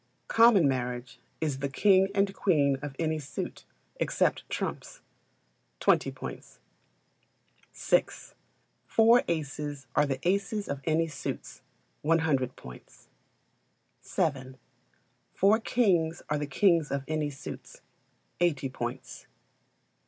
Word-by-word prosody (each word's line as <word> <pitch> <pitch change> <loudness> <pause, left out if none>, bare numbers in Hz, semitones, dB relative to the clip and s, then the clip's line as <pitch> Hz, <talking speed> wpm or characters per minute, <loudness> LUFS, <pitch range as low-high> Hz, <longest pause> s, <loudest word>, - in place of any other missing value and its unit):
Common 225 -8 +6
Marriage 125 -1 -3 0.2
is 145 -4 -1
the 140 0 -2
king 190 +5 +4
and 195 0 +2
queen 145 -8 +2
of 145 -2 -6
any 160 -1 -1
suit, 145 -1 -6 0.3
except - - 0
trumps - - -5 0.8
20 - - +3
points. - - -9 1.1
vi. - - +2 0.8
Four 230 +2 +5
aces 145 -3 -3
are 150 - +3
the 135 -1 -1
aces 200 +2 0
of 140 -1 -4
any 165 +1 +2
suits 145 -4 -6 0.4
100 150 -5 +1
points. 65 -1 -14 0.9
vii. 130 -4 -2 0.8
Four 205 +4 +4
kings 180 -9 +1
are 150 - +1
the 145 - -3
kings 165 +1 +3
of 140 -1 -2
any 155 -1 -1
suits 135 -1 -10 0.6
80 145 -6 +1
points. 125 0 -6
155 Hz, 110 wpm, -28 LUFS, 135-185 Hz, 1.1 s, Common